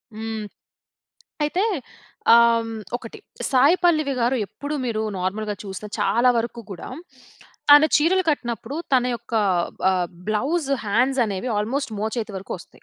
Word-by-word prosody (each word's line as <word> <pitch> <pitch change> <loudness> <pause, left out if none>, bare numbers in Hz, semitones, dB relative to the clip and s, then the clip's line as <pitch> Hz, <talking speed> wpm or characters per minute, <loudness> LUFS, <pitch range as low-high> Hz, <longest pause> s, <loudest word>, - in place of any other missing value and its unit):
హ్మ్. 220 -1 -4 1.0
అయితే, 345 +6 0 0.7
ఆహ్, 230 -1 +4 0.3
ఒకటి 230 -2 -11 0.3
సాయి 280 +7 +5
పల్లవి 310 -5 +3
గారు 240 +3 +2
ఎప్పుడు, 285 +7 -5
మీరు 220 -3 -1 0.2
నార్మల్‌గా 205 +3 -2
చూస్తే, 195 +1 -7
చాలా 235 +5 +3
వరకు 235 +1 -3
కూడా 180 - -7 0.8
తన 290 +1 +9
చీరలు 360 +5 +3
కట్టినప్పుడు, 240 -2 -2 0.2
తన 255 -2 +4
యొక్క 235 0 -12 0.6
ఆహ్, 180 -2 0 0.2
బ్లౌస్ 275 +8 0 0.2
హ్యాండ్స్ 250 +6 +2
అనేవి 205 +3 -3
ఆల్మోస్ట్ 230 +4 -2
మోచేతి 220 +1 -3
వరకు 190 - -6
వస్తాయి. - - -17
235 Hz, 125 wpm, -23 LUFS, 215-275 Hz, 1.0 s, తన